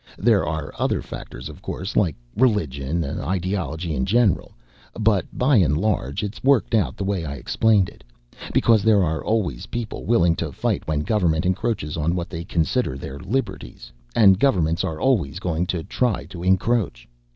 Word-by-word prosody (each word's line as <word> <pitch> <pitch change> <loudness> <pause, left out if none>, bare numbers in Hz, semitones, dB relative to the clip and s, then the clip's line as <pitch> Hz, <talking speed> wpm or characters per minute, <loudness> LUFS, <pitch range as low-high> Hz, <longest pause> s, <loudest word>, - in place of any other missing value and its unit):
There 110 -4 +3
are 75 -1 -3
other - - 0
factors, - - -8
of - - -11
course, 95 +3 -5
like 85 -8 +2 0.2
religion 85 - +1
ideology 90 0 -2
in 65 -3 -1
general. 105 -7 +2 0.5
But 105 -5 +2
by 130 +1 +3
and 75 -7 +3
large, 90 - -1
it's 105 +1 -6
worked 135 -3 +3
out 95 - +1
the - - -3
way 95 -3 -1
I 70 -2 -4
explained 100 - +2
it. - - -14 0.5
Because 115 -3 +4
there 105 -1 +4
are 80 -1 -1
always 100 - -1
people 115 -2 -5
willing 85 -7 +3
to - - -3
fight - - -2
when 75 -1 0
government 85 -3 +1
encroaches 95 -5 -1
on 80 +3 0
what 90 +2 -4
they 85 -2 -5
consider 85 - 0
their 70 +1 -7
liberties, 95 - -4 0.2
and 95 -4 +6
governments 85 - +2
are 80 -1 -3
always 95 - +1
going 90 -1 -1
to 85 -3 -2
try 120 +1 -1
to 85 - -7
encroach. 95 - +1
90 Hz, 170 wpm, -23 LUFS, 80-110 Hz, 0.5 s, and